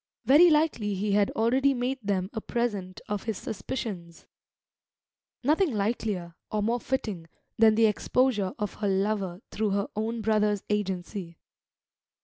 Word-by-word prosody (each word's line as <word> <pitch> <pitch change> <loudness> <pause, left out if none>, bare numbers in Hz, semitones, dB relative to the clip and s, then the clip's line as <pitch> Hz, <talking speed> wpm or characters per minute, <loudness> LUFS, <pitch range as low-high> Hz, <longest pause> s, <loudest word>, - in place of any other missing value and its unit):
Very 315 +6 +7
likely 300 -10 +2
he 200 +2 -1
had 200 0 +3
already 260 +5 +3
made 255 +2 -1
them 195 -1 -1
a 220 - -3
present 205 -7 -3
of 205 0 -3
his 220 -4 -2
suspicions; 190 -7 -6 1.2
nothing 310 +5 +3
likelier, 200 -4 -2 0.2
or 210 -1 0
more 235 +3 +1
fitting, 210 -10 -3 0.3
than 220 -1 +6
the 225 0 +5
exposure 215 -2 +1
of 210 -1 -3
her 205 - +1
"lover" 195 -1 -1
through 215 0 0
her 200 +1 0
own 225 +2 -2
brother's 210 -2 +1
agency. 190 -3 -3
210 Hz, 135 wpm, -27 LUFS, 195-235 Hz, 1.2 s, Very